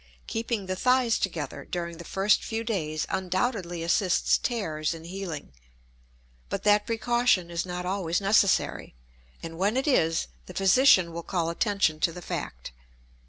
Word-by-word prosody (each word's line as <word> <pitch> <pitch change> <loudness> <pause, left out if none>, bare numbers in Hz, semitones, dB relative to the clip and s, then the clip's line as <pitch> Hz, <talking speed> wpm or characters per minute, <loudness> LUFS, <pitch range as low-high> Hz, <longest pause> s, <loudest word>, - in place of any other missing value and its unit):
Keeping 225 -3 -3
the 185 0 -2
thighs 250 +2 +2
together 160 -7 -3
during 170 -1 -5
the - - -7
first 195 +4 +2
few 225 0 -3
days 155 -9 -2
undoubtedly 185 -2 -2
assists 180 +2 +2
tears 165 -10 -2
in 165 - -10
healing, 170 - -6 1.0
but - - -3
that 210 0 +3
precaution 230 -6 +1
is 170 +2 -2
not 180 0 -4
always 180 -2 -1
necessary, 200 - +2 0.5
and 165 0 -7
when 205 +6 +1
it 270 - 0
is 165 - +2 0.2
the - - -10
physician 190 -3 +5
will 170 - -4
call 170 -1 -1
attention 195 -5 +1
to 170 - +2
the 175 +1 -9
fact. - - -5
185 Hz, 150 wpm, -27 LUFS, 170-215 Hz, 1.0 s, physician